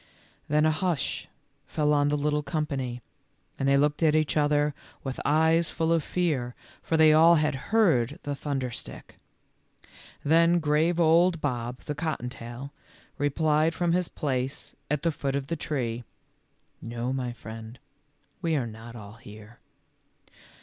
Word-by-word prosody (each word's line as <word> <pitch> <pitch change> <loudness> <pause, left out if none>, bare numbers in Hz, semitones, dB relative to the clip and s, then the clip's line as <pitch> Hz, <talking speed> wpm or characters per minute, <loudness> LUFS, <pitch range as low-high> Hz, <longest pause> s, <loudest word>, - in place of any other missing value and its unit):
Then 150 +1 +3
a 155 - +4
hush 155 -3 -1 0.4
fell 150 -1 +1
on 145 -1 +3
the 150 0 +1
little 150 +1 0
company, 135 -6 -3 0.6
and 135 - +1
they 140 - +5
looked 145 +2 +1
at 155 -2 +4
each 155 -1 +2
other 150 0 +2 0.3
with 135 -1 -4
eyes 160 +3 +3
full 165 0 0
of 165 -2 +1
fear, 140 -10 -1 0.3
for 160 - 0 0.2
all 165 +2 +7
had 150 -1 +2 0.2
heard 160 - +3
the 145 - -3
thunder 135 -3 -3
stick. - - -8 1.1
Then 165 +3 +5
grave 160 +2 +2
old 170 +1 +4
Bob, 125 -4 -3
the 150 - -4
cottontail, 130 -3 -5 0.5
replied 155 +2 +2
from 175 -1 +1
his 180 0 +1
place 130 -2 -3
at 150 -1 -1
the 165 - +2
foot 140 -2 -3
of 140 -1 -2
the 165 - -3
tree, 125 -7 -3 0.4
" - - -44 0.2
No, 125 +2 -1
my 125 -2 -2
friend, 115 0 -9 0.6
we 165 -3 +1
are 135 -5 0
not 115 +1 -9
all 105 -3 -10
here." 110 +1 -13
145 Hz, 150 wpm, -27 LUFS, 125-160 Hz, 1.1 s, all